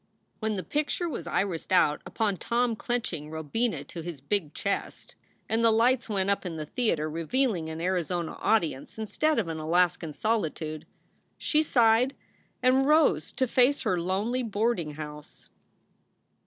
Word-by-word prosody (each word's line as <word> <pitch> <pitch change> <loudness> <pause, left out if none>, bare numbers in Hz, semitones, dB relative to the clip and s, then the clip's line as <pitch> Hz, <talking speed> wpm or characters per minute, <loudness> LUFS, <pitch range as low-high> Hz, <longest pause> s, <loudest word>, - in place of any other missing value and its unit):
When 220 -1 -1
the 185 - -3
picture 305 +4 -1
was 175 - -5
irised 175 -1 -1
out 150 -5 +4
upon 210 -4 0
Tom 235 +2 0
clenching 215 -11 -3
Robina 160 +10 -2
to 170 - -8
his 165 -3 -6
big 155 +2 -2
chest, 200 - -3 0.3
and 225 +1 +1
the 230 - +6
lights 235 +2 +3
went 200 -1 +1
up 200 - 0
in 175 -3 -4
the 155 -1 -4
theater, 165 - 0
revealing 165 - 0
an 160 0 -5
Arizona 175 -1 -1
audience 165 -11 0
instead 300 +8 0
of 215 -6 +1
an 160 -1 -4
Alaskan 170 0 +1
soli 215 -2 +1
tude, 155 0 -7 0.5
she 305 -2 +2
sighed 245 -2 +3 0.5
and 260 +2 +4
rose 300 - +3
to 260 - +1
face 255 +3 +3
her 180 -2 +1
lonely 205 +8 0
boarding 210 -8 -1
house. 150 -1 -9
200 Hz, 155 wpm, -28 LUFS, 160-240 Hz, 0.5 s, the